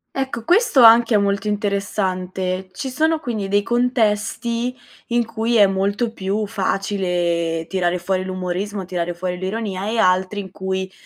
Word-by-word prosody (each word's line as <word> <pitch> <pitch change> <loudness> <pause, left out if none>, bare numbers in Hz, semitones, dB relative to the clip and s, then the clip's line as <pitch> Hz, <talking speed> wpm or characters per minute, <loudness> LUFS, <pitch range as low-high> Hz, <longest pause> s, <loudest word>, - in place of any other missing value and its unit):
Ecco, 265 -4 -3
questo 350 - +4
anche 230 0 +7
è - - +7
molto 200 +1 0
interessante. 190 -3 -2
Ci 265 - -5
sono, 315 +4 +1
quindi, 220 -9 -4
dei 205 +1 +2
contesti 235 +1 0 0.3
in 240 0 +1
cui 230 +1 -1
è 205 -2 +7
molto 200 +4 -1
più 200 +1 -2
facile 180 -4 -1
tirare 180 -2 0
fuori 185 +1 -1
l'umorismo, 185 +2 -3
tirare 175 -1 -3
fuori 180 +1 -4
l'ironia 195 0 -3
e 225 - -1
altri 185 0 +2
in 190 -2 -8
cui 190 0 -4
200 Hz, 145 wpm, -20 LUFS, 185-230 Hz, 0.3 s, anche